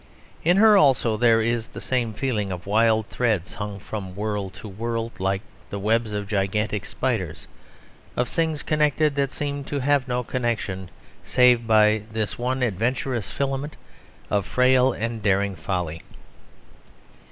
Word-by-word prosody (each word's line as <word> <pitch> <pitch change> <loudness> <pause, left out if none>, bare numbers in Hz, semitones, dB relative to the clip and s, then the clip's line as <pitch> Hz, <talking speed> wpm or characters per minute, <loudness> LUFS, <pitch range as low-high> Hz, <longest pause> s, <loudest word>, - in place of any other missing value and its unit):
In 175 +4 +4
her 215 0 +7
also 130 - +4
there 115 0 +4
is 115 0 -1
the - - -9
same 120 -4 -1
feeling 105 -7 -1
of 90 -1 -6
wild 110 +1 +3
threads 110 -8 0
hung 105 -1 -5
from 95 -2 -7
world 105 -2 -3
to - - -9
world 115 +3 -4
like 95 +1 0 0.3
the 100 - -4
webs 110 +2 +1
of 105 -1 -3
gigantic 105 0 -1
spiders; 95 - -3 0.7
of 125 - +1
things 160 -2 -1
connected 150 0 +2
that 140 -1 0
seem 145 -1 -3
to 145 - -3
have 140 0 +2
no 125 0 -1
connection 100 -7 -2 0.3
save 125 -2 +4
by 110 -1 +5
this 110 0 -3
one 130 +1 -1
adventurous 120 +2 -1
filament 140 +2 -3 0.6
of 100 -2 +1
frail 130 0 +4
and 115 -1 -4
daring 100 -1 +1
folly. 90 -5 -3
115 Hz, 145 wpm, -24 LUFS, 100-130 Hz, 0.7 s, her